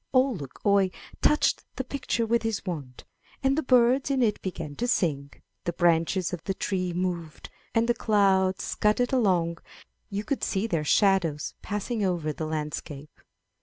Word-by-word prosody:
Ole 260 +1 +4
Luk 140 - -9
oie 200 -2 +4 0.3
touched 300 - +3
the 260 - -2
picture 250 -3 -2
with 235 +1 +2
his 225 -3 -2
wand, 145 -9 -6 0.4
and 270 0 +3
the 315 - +1
birds 255 +1 +4
in 270 -2 +2
it 215 -3 +1
began 165 -6 -5
to 245 - -1
sing, 145 - 0 0.4
the 175 - -1
branches 170 +2 +2
of 170 -2 -5
the 195 - -1
trees 185 -3 -2
moved, 175 -3 -4 0.2
and 225 +1 +3
the 240 - +4
clouds 195 -4 +2
scudded 235 +4 +1
along; 180 -9 +2 0.5
you 200 +1 -3
could 270 +6 -2
see 195 +1 0
their 165 -9 -1
shadows 175 -4 +2
passing 210 +2 -2
over 170 -5 0
the 155 +1 -4
landscape. 150 -1 -5
190 Hz, 165 wpm, -27 LUFS, 165-230 Hz, 0.5 s, Ole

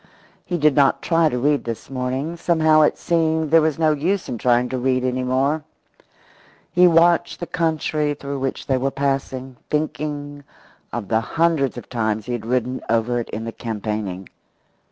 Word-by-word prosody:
He 175 - -2
did 150 -2 +4
not 140 -1 +3
try 165 -2 +3
to 125 - -2
read 145 +3 +1
this 115 -1 -5
morning; 130 +5 -3
somehow 160 -2 +3
it 150 - +3
seemed 160 -2 0
there 165 0 +7
was 155 -1 0
no 160 -1 +3
use 170 +6 -1
in 120 -3 -4
trying 125 +1 +3
to 130 - -2
read 130 0 +1
any 130 0 -1
more. 135 +5 0 1.1
He 180 +1 +6
watched 170 0 +3
the 175 - -4
country 155 -3 -1
through 140 -1 -5
which 135 0 -3
they 130 -2 +1
were 135 +2 0
passing, 135 -2 -3
thinking 145 -1 -3 0.5
of 115 -4 -4
the 110 0 +2
hundreds 160 0 +1
of 120 - -8
times 110 -3 -1
he 125 - -3
had 115 -2 -4
ridden 125 +1 -1
over 115 +2 +1
it 120 - -5
in 115 +1 -5
campaigning. 105 -5 -4
135 Hz, 175 wpm, -21 LUFS, 125-155 Hz, 1.1 s, there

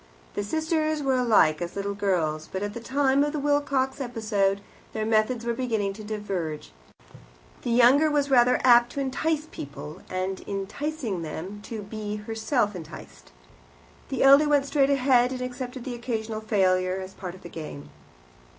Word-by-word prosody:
The 205 - -2
sisters 315 +4 0
were 265 -1 +2
alike 205 -11 +4
as 175 0 -4
little 200 0 -2
girls, 165 -6 -1
but 190 +1 -3
at 205 0 -3
the 235 - -6
time 270 +3 +2
of 295 +1 -1
the 300 - -1
Wilcox 280 -2 0
episode 215 -5 0 0.3
their 215 -1 -2
methods 225 +2 +1
were 235 - 0
beginning 225 -5 -1
to 215 +2 -10
diverge; 195 - -4 0.9
the - - -4
younger 250 +6 +5
was 290 -2 0
rather 250 -1 +5
apt 240 -1 +6
to - - -4
entice 300 +3 -1
people, 145 +4 -8
and, 185 +1 -2
in 195 -1 -4
enticing 235 - -4
them, 170 +6 -6
to 220 -3 -6
be 210 0 -5
herself 220 0 -1
enticed; 105 - -11 0.8
the - - 0
elder 280 +2 +7
went 285 -2 +3
straight 275 -1 +2
ahead, 255 -2 +3
and 255 - -5
accepted 250 0 -6
an 255 - -4
occasional 225 -2 -4
failure 185 -3 +1
as 190 0 -8
part 180 -2 -7
of 185 - -16
the - - -7
game. 75 - -8
225 Hz, 170 wpm, -26 LUFS, 195-265 Hz, 0.9 s, elder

